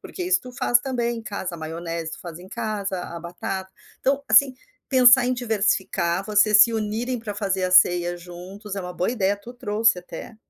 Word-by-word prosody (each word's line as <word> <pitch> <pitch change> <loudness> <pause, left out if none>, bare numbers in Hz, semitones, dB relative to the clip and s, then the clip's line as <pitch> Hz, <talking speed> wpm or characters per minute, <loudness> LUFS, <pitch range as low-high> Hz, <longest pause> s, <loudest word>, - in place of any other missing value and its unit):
porque 370 - -8
isso 370 0 +2
tu 250 - -11
faz 240 -1 +2
também 240 -3 -2
em - - -9
casa, 195 -4 -5
maionese 165 0 -5
tu - - -9
faz 170 -2 -9
em 185 +1 -13
casa, 200 -3 -4
a 170 -1 -8
batata, 190 +2 -6 0.3
então 275 +1 0
assim, 270 -2 +5 0.3
pensar 255 -1 +6
em 255 - 0
diversificar, 195 -6 -1
vocês 210 0 +6
se 230 - -4
unirem 225 +3 -2
para 220 -2 -6
fazer 195 -2 -2
a 185 - -1
ceia 175 -1 +4
juntos 185 +4 -9
é 195 - -4
uma 180 0 -7
boa 180 - -2
ideia, 205 -4 0
tu 215 +4 -12
trouxe 220 -3 +1
até, 195 +4 -10
205 Hz, 195 wpm, -23 LUFS, 180-235 Hz, 0.3 s, pensar